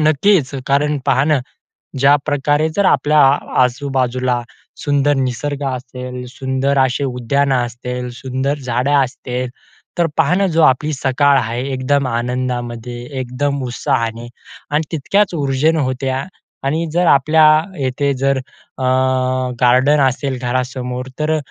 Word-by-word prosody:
नक्कीच 155 0 +3 0.2
कारण 145 +1 +1
पहा 135 - +3
ना 150 - +4 0.6
ज्याप्रकारे 145 +2 +2
जर 200 - +2
आपल्या 150 +2 +3 0.5
आजूबाजूला 130 -1 -1 0.4
सुंदर 145 0 +2
निसर्ग 135 +3 -2
असेल, 125 0 -6
सुंदर 135 +1 -1
असे 130 +1 +1
उद्यानं 135 +2 0
असतील, 125 +1 -5
सुंदर 130 +3 -2
झाडं 125 +3 0
असतील, 125 0 -5 0.5
तर 170 - +3
पहा 160 +2 +3
ना 195 +1 +2
जो 165 - +5
आपली 150 +3 +3
सकाळ 140 +1 +2
आहे 120 +1 -2
एकदम 135 +1 0
आनंदामध्ये 120 0 -3 0.2
एकदम 135 +2 -2
उत्साहाने 115 -1 -2 0.4
आणि 150 +2 +1
तितक्याच 185 +5 +1
उर्जेन 145 +2 +1
होते. 130 -2 -1
आ, 130 +3 -1 0.4
आणि 160 +4 0
जर 175 +1 +2
आपल्या 155 +2 +4 0.4
येथे 140 +2 0
जर 135 +1 +1
अ, 130 0 -12 0.8
गार्डन 130 +4 +4
असेल 130 0 -2
घरासमोर. 125 0 -3
तर 155 +1 +1
135 Hz, 125 wpm, -17 LUFS, 125-145 Hz, 0.8 s, जो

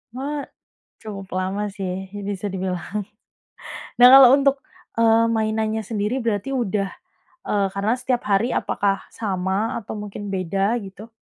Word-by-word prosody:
Wah, 285 +2 -4 0.5
cukup 195 -3 -8
lama 190 +3 -2
sih 190 -1 -5 0.2
bisa 205 0 -3
dibilang. 185 -2 -3 1.2
Nah 245 - +9
kalau 270 -1 +9
untuk, 275 0 +3 0.4
eee, 230 0 +5
mainannya 220 0 0
sendiri 215 +3 -1
berarti 230 0 -2
udah, 210 -7 -1 0.6
eee, 200 -1 +2
karena 200 +3 0
setiap 250 -1 -1
hari 205 +5 +2
apakah 195 -1 0
sama 195 +1 -2
atau 210 - -7
mungkin 205 0 -6
beda 195 +4 0
gitu? 200 +4 -11
210 Hz, 130 wpm, -22 LUFS, 195-230 Hz, 1.2 s, Nah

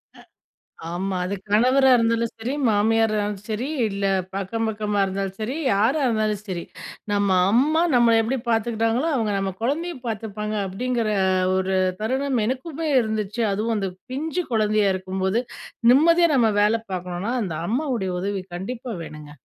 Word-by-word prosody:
அ - - -16 0.7
ஆமா. 190 +1 -2
அது 195 +2 -2 0.2
கணவரா 255 +5 +4
இருந்தாலும் 230 0 +1
சரி. 240 +4 -3 0.2
மாமியாரா 220 +1 +2
இருந்தாலும் 205 -1 -3
சரி. 225 +5 -2 0.2
இல்ல 200 0 -3 0.3
பக்கம், 210 +4 -2
பக்கமா 210 -1 -2
இருந்தாலும் 195 0 -4
சரி. 245 +7 -2 0.2
யாரா 235 +10 +2
இருந்தாலும் 215 -3 0
சரி. 175 -3 -4 0.5
நம்ம 200 -1 +1 0.2
அம்மா 300 +8 +3
நம்மள 235 -1 +5
எப்பிடி 250 +4 -1
பார்த்துக்கிட்டாங்களோ! 225 +5 +1
அங்க 220 -2 0
நம்ம 195 -1 -2
குழந்தைய 325 +8 -1
பார்த்துப்பாங்க, 215 -1 -4
அப்பிடிங்கிற 230 +4 -1 0.5
ஒரு 190 0 0 0.3
தருணம் 260 +2 0
எனக்குமே 300 +6 -3
இருந்துச்சு. 215 0 -2
அதுவும் 220 +3 -1
அந்த 195 -2 -1 0.2
பிஞ்சு 320 +6 -2
குழந்தையா 215 -2 +2
இருக்கும்போது, 190 +3 -1 0.5
நிம்மதியா 335 +5 +5
நம்ம 230 -4 +4
வேல 215 +2 +3
பார்க்கணுனா, 180 +4 -3
அந்த 165 -5 -4
அம்மாவுடைய 240 -6 -1
உதவி 195 -1 -2
கண்டிப்பா 235 +5 -5
வேணுங்க. 150 -2 -10
220 Hz, 140 wpm, -23 LUFS, 200-245 Hz, 0.7 s, நம்மள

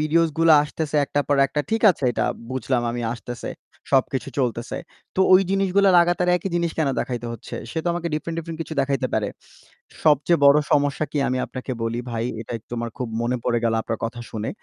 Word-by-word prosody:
ভিডিওসগুলা 160 +1 +4
আসতেছে 150 0 -3
একটার 145 0 -1
পর 145 - +3
একটা, 150 - -2
ঠিক 225 - 0
আছে 175 - -5
এইটা 120 - -1 0.3
বুঝলাম 130 -1 0
আমি 120 0 -3
আসতেছে, 120 0 -6 0.4
সবকিছু 135 -1 +1
চলতেছে। 120 -2 -1 0.4
তো 190 - 0
ওই 185 - +8
জিনিসগুলা 195 0 +3
লাগাতার 175 +1 +2
একই 195 - -4
জিনিস 170 -1 +1
কেন 155 - +2
দেখাইতে 120 -2 -4
হচ্ছে? 115 - -8 0.2
সে 165 - -3
তো - - -6
আমাকে 170 0 -2
ডিফারেন্ট, 165 +2 -3
ডিফারেন্ট 165 -1 -6
কিছু 160 - -7
দেখাইতে 135 -1 0
পারে। 105 -2 0 0.8
সবচেয়ে 155 +2 +4
বড় 140 +1 +8
সমস্যা 145 +1 +2
কী, 150 - -2
আমি 130 - 0
আপনাকে 130 0 -6
বলি 115 +1 -2
ভাই, 115 0 -2 0.2
এটা 115 - -9
একটু - - -35
আমার 115 0 -3
খুব 125 - -3
মনে 125 +2 0
পড়ে 120 -1 +1
গেল 115 -1 +2
আপনার 115 - -3
কথা 115 +1 -6
শুনে। 110 -1 -4
140 Hz, 195 wpm, -23 LUFS, 120-165 Hz, 0.8 s, ওই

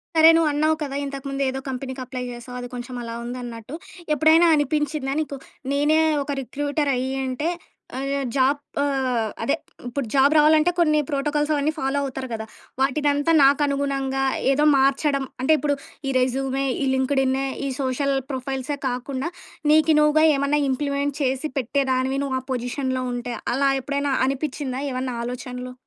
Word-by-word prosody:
సరే. 320 0 +8
నువ్వు 330 -2 +3
అన్నావు 310 +2 +2
కదా! 275 -1 -4
ఇంతకుముందు 275 0 -5
ఏదో 265 +1 -3
కంపెనీకి 260 0 -5
అప్లై 250 0 -5
చేసావు. 240 +1 -9
అది 245 - -5
కొంచెం 245 +1 -6
అలా 230 0 -5
ఉందన్నట్టు, 240 +1 -6 0.4
ఎప్పుడైనా 320 +3 +5
అనిపించిందా 295 -1 0
నీకు 290 -2 -4 0.4
నేనే 295 +3 +3 0.2
ఒక 285 - -5
రిక్రూటరయ్యింటే, 270 0 -1 0.5
అయ్యా 275 +1 -1 0.2
జాబ్ 275 +2 +3 0.2
ఆహ్, 260 -5 0
అదే 255 - +2 0.3
ఇప్పుడు 265 +2 -3
జాబ్ 280 +2 +5
రావాలంటే 310 +3 +5
కొన్ని 305 -3 +4
ప్రోటోకాల్సవన్నీ 295 +1 0
ఫాలో 270 +1 0
అవుతారు 265 -1 -4
కదా! 220 0 -4 0.4
వాటినంతా 290 +2 +2
నాకనుగుణంగా 275 -1 +2 0.3
ఏదో 295 +2 +3
మార్చడం 275 +1 +2 0.2
అంటే, 265 - +2
ఇప్పుడు 290 -1 +1 0.3
ఈ - - +1
రెజ్యూమే, 270 +1 0 0.2
ఈ - - +1
లింక్డ్‌ఇన్ 265 0 +1 0.3
ఈ - - -1
సోషల్ 275 +1 0 0.2
ప్రొఫైల్సే 265 +2 -3
కాకుండా, 260 +4 -3 0.4
నీకు 315 0 +5
నువ్వుగా 300 +1 +4
ఏమన్నా 280 +2 +1
ఇంప్లిమెంట్ 280 +1 -1
చేసి, 270 +3 0
పెట్టేదానివి 265 +1 0
నువ్వ 260 -1 -1
పొజిషన్‌లో 255 +1 -2
ఉంటే 245 0 -4 0.2
అలా 275 +2 +2
ఎప్పుడైనా 280 +1 -1
అనిపించిందా? 270 -1 -3
ఏమన్నా 255 -1 -3
ఆలోచనలు, 250 +1 -6
275 Hz, 135 wpm, -23 LUFS, 260-290 Hz, 0.5 s, సరే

